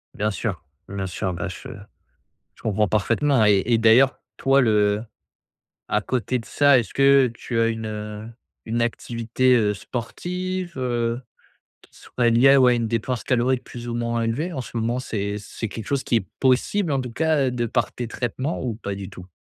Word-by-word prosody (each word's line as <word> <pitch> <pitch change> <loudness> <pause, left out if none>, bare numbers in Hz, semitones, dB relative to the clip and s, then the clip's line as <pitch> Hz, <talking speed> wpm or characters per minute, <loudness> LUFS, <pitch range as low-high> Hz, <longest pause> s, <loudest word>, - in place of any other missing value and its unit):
Bien 105 +1 0
sûr, 100 -4 -4 0.2
bien 95 -1 -4
sûr, 90 +1 -3
bah, 85 - -4
je 90 - -8 0.9
je - - -20
comprends 105 -2 +1
parfaitement 115 +4 +2
et 100 -2 +5
et 120 -1 +3
d'ailleurs, 115 +4 +5 0.2
toi, 135 +1 +3
le 105 -2 +2 0.8
à 105 - +1
côté 125 +2 -1
de 115 - -11
ça, 145 -2 +4
est-ce 110 -6 -5
que 135 -1 +5
tu 115 +1 -3
as 115 - +3
une, 115 -1 -3
heu, 105 0 -6 0.4
une 115 +1 -1
activité, 120 +2 +1
heu, 105 -3 +2
sportive, 180 - -4
heu, 120 -1 -1 0.6
qui - - -22
soit 120 -1 -1
liée, 135 +4 +6
ouais, 125 -2 +6
à - - +2
une 115 -1 -1
dépense 115 +2 -2
calorique 125 0 +1
plus 120 0 -8
ou 115 - -3
moins 115 0 -1
élevée? 140 +11 -1
En 135 - -4
ce 120 - -8
moment, 115 +2 0
c'est 100 -4 -3
c'est 105 +2 -6
quelque 110 0 -7
chose 140 -2 -1
qui 120 - +2
est 100 -4 -1
possible 145 +7 +2
en 135 - +1
tout 125 -2 -5
cas 150 -2 +1
de 120 -1 -1
par 120 0 0
tes 120 - -4
traitements 130 +6 -3
ou 120 -4 -2
pas 100 -3 -5
du 95 0 -7
tout? 90 -1 -11
120 Hz, 190 wpm, -23 LUFS, 110-130 Hz, 0.9 s, liée